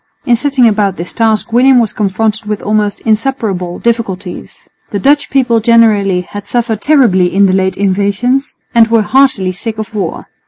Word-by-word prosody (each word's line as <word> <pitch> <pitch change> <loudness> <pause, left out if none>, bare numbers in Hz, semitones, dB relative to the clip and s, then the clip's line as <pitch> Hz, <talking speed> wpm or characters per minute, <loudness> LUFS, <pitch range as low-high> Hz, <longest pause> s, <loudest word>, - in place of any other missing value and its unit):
In 240 - +3
setting 265 -1 +2
about 205 -3 0
this 170 0 -7
task 225 0 0
William 255 +2 +4
was 225 -4 -1
confronted 215 +2 -2
with 210 -1 -4
almost 210 -1 -1
insuperable 215 -6 -2
difficulties. 205 -6 -4 0.2
The 205 - -3
Dutch 285 +8 +1
people 245 -4 +1
generally 215 -5 +2
had 205 +3 -9
suffered 225 0 -2
terribly 225 -12 +3
in 200 +1 +3
the 185 - +1
late 190 -1 0
invasions 205 +8 -1 0.2
and 230 -1 +5
were 225 -1 +2
heartily 260 -7 +2
sick 220 +4 -5
of 220 +1 -6
war. 195 -6 -4
215 Hz, 165 wpm, -12 LUFS, 195-235 Hz, 0.2 s, and